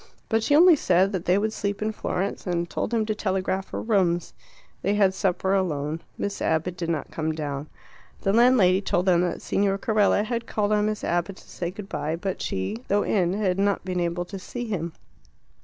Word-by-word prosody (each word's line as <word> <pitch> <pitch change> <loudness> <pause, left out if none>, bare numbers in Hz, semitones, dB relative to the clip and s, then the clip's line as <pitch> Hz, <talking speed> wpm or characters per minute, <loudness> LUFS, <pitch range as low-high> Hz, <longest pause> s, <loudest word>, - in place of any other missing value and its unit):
But 225 -1 +2
she 285 +6 +2
only 345 +2 +8
said 185 -6 +2
that 185 -4 -3
they 180 +2 +3
would 215 +1 0
sleep 200 -1 -2
in 215 0 -1
Florence, 195 -2 -3
and 170 -1 0
told - - -3
him 225 -2 +1
to 215 - -1
telegraph 190 -2 -1
for - - -5
rooms. 180 -6 +1 0.5
They 200 +3 +1
had 195 -2 +4
supper 190 -1 0
alone. 160 -4 -1 0.2
Miss 200 0 -3
Abbott 160 +3 0
did 170 -2 -4
not 155 -4 -2
come 160 0 -2
down. 145 -1 -4 0.5
The 195 - +1
landlady 220 -6 +5
told 180 -2 0
them 175 -2 +4
that 180 - -2
Signor 195 0 +1
Carella 210 -1 +2
had 235 +1 -3
called 210 -1 0
on 210 0 +2
Miss 215 -1 -3
Abbott 175 +3 -1
to - - -17
say 175 - -4
good 195 +2 -8
bye, 160 -6 -2
but 190 +2 -4
she, 95 +3 -2
though 205 +1 +2
in, 180 -4 +1
had 195 -2 0
not 200 -2 +1
been 180 -1 -2
able 175 0 -1
to 195 +2 -7
see 240 +6 -6
him. 170 -7 -3
190 Hz, 205 wpm, -25 LUFS, 175-210 Hz, 0.5 s, only